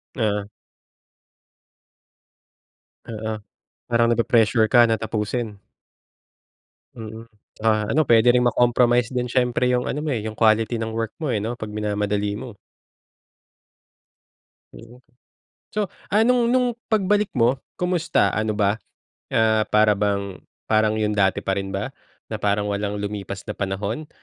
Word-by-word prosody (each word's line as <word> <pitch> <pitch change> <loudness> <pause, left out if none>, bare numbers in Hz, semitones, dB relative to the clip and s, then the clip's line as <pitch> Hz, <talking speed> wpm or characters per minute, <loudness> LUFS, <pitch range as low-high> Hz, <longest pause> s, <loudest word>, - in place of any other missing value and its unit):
Ah. 105 -4 0 2.6
Oo, 110 0 -4 0.6
parang 115 0 +3
nape-pressure 115 -1 +3
ka 120 -2 +7
na 110 - +2
tapusin. 110 -1 -3 1.3
Mm, 110 -1 -9 0.4
ah, 110 -1 +2
ano 155 +2 +3
puwede 120 -1 +5
ring 125 - +3
ma-compromise 120 0 +3
din 125 -1 -1
siyempre 125 -1 +1
yung 125 0 0
ano 150 +2 -3
mo, 150 - -1
eh, 115 -4 -1
yung 110 0 -5
quality 110 +1 +3
ng 115 0 -3
work 115 -1 -3
mo, 140 - 0
eh, 110 - 0
'no, 115 +4 -3
pag 110 -2 -7
minamadali 105 -1 -1
mo. 120 +1 -8 2.2
Mm. 120 +2 -14 0.7
So, 210 -3 -2 0.2
ah, 210 +3 +4
nung 245 -1 +3
nung 250 -1 +2 0.2
pagbalik 210 -1 +2
mo 125 +3 +3 0.2
kamusta 180 - +1
ano 110 0 -1
ba, 105 +2 +1 0.5
ah, 110 -1 +2
para 105 0 +4
bang 100 -1 -2 0.3
parang 110 0 +2
yung 105 -1 0
dati 95 -2 +1
pa 95 - 0
rin 95 0 -5
ba, 100 +7 -4 0.4
na 110 - -3
parang 105 0 0
walang 100 0 -2
lumipas 100 -1 -5
na 105 - -4
panahon 100 +10 -3
110 Hz, 135 wpm, -23 LUFS, 105-125 Hz, 2.6 s, ka